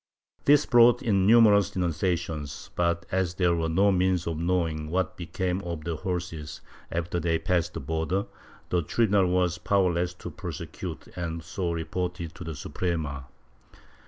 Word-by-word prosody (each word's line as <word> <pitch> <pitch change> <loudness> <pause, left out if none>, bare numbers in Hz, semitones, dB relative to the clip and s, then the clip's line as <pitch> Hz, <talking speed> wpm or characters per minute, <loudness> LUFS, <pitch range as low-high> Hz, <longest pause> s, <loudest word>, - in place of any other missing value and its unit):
This 145 +1 +6
brought 120 -1 +5
in 100 -5 +2
numerous 105 -4 +6
denunciations 85 -4 -2
but, 85 -1 0
as 95 -2 0
there 90 -2 +3
were 80 -1 -1
no 100 +5 +4
means 90 -1 +1
of 80 -2 -3
knowing 85 -3 0
what 95 +2 -1
became 90 +2 -2
of 85 -4 -5
the 85 0 -2
horses 85 -4 -4 0.3
after 85 +1 -2
they 85 0 +1
passed 85 +1 0
the 80 - -4
border, 80 +7 -1 0.4
the 90 - +2
tribunal 100 +2 +2
was 90 -1 +1
powerless 90 -3 +1
to - - -8
prosecute - - -6
and 85 -2 -4
so 90 +1 -3
reported 85 0 -3
to 90 - -9
the 80 -2 -5
Suprema. 75 -5 -3
90 Hz, 150 wpm, -27 LUFS, 80-95 Hz, 0.4 s, This